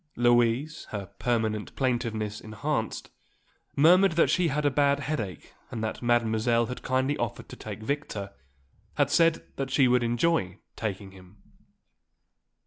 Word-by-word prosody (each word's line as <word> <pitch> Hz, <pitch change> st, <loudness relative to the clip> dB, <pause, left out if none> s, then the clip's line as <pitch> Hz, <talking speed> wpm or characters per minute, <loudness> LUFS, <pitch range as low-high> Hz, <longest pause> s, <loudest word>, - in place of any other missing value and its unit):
Louise, 120 Hz, +5 st, +2 dB
her 105 Hz, -2 st, -4 dB
permanent 110 Hz, -3 st, -1 dB
plaintiveness 115 Hz, -5 st, -1 dB
enhanced, 110 Hz, -1 st, -3 dB, 0.6 s
murmured 180 Hz, +5 st, +6 dB
that 165 Hz, -, +3 dB
she 180 Hz, -2 st, +2 dB
had 150 Hz, 0 st, -1 dB
a 145 Hz, -, +3 dB
bad 140 Hz, +1 st, +2 dB
headache 115 Hz, -, -4 dB, 0.2 s
and 110 Hz, -2 st, -5 dB
that 110 Hz, -, -3 dB
Mademoiselle 120 Hz, 0 st, +2 dB
had 125 Hz, +2 st, -6 dB
kindly 130 Hz, +2 st, 0 dB
offered -, -, -3 dB
to -, -, -8 dB
take 110 Hz, -, -8 dB
Victor, 110 Hz, -7 st, -3 dB, 0.6 s
had -, -, +2 dB
said 165 Hz, -1 st, +3 dB
that 135 Hz, -1 st, -2 dB
she 135 Hz, 0 st, +4 dB
would 125 Hz, 0 st, +3 dB
enjoy 120 Hz, -, +1 dB, 0.2 s
taking 100 Hz, -3 st, -4 dB
him. 95 Hz, +1 st, -16 dB
120 Hz, 135 wpm, -27 LUFS, 110-140 Hz, 0.6 s, murmured